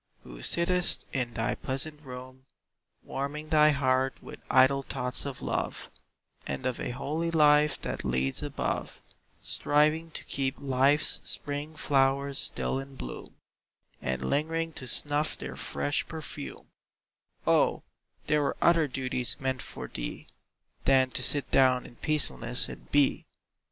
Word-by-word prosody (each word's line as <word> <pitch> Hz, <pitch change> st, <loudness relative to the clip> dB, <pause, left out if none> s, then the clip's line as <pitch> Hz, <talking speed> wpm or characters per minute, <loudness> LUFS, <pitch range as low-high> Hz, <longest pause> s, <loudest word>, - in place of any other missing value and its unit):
who -, -, -11 dB
sittest 175 Hz, -, +2 dB
in 125 Hz, -3 st, -1 dB
thy 115 Hz, -2 st, 0 dB
pleasant 150 Hz, +3 st, -2 dB
room, 130 Hz, -1 st, -10 dB, 0.6 s
Warming 150 Hz, +3 st, -5 dB
thy 155 Hz, -1 st, +6 dB
heart 130 Hz, -2 st, +1 dB
with -, -, -11 dB
idle 130 Hz, +1 st, +5 dB
thoughts 125 Hz, 0 st, +2 dB
of 135 Hz, -3 st, -6 dB
love, -, -, -3 dB, 0.6 s
And 130 Hz, -, -4 dB
of 130 Hz, -2 st, -1 dB
a -, -, -3 dB
holy 150 Hz, +7 st, -2 dB
life 150 Hz, -2 st, +4 dB
that -, -, -3 dB
leads 65 Hz, +1 st, 0 dB
above, -, -, -3 dB, 0.4 s
Striving 155 Hz, +3 st, +2 dB
to -, -, -5 dB
keep 135 Hz, 0 st, -2 dB
life's 140 Hz, +2 st, +2 dB
spring 145 Hz, +2 st, -3 dB
flowers 140 Hz, -1 st, +2 dB
still 135 Hz, -, 0 dB
in 135 Hz, 0 st, -9 dB
bloom, 60 Hz, -, -8 dB, 0.7 s
And 65 Hz, 0 st, -2 dB
lingering 165 Hz, -, -1 dB
to 130 Hz, -, -7 dB
snuff 145 Hz, +4 st, +2 dB
their 65 Hz, -1 st, -7 dB
fresh 70 Hz, +2 st, -2 dB
perfume -, -, -7 dB, 0.8 s
O, -, -, +3 dB, 0.4 s
there 150 Hz, 0 st, +2 dB
were 140 Hz, -, -1 dB
other 165 Hz, -3 st, +4 dB
duties 130 Hz, -2 st, 0 dB
meant 130 Hz, -1 st, -2 dB
for -, -, -7 dB
thee, -, -, -6 dB, 0.6 s
Than 130 Hz, -1 st, +4 dB
to -, -, -2 dB
sit 145 Hz, -2 st, +1 dB
down 130 Hz, -1 st, +4 dB
in 120 Hz, -, -14 dB
peacefulness 150 Hz, -, +1 dB
and -, -, -11 dB
Be! 145 Hz, -1 st, +2 dB
135 Hz, 135 wpm, -29 LUFS, 130-150 Hz, 0.8 s, thy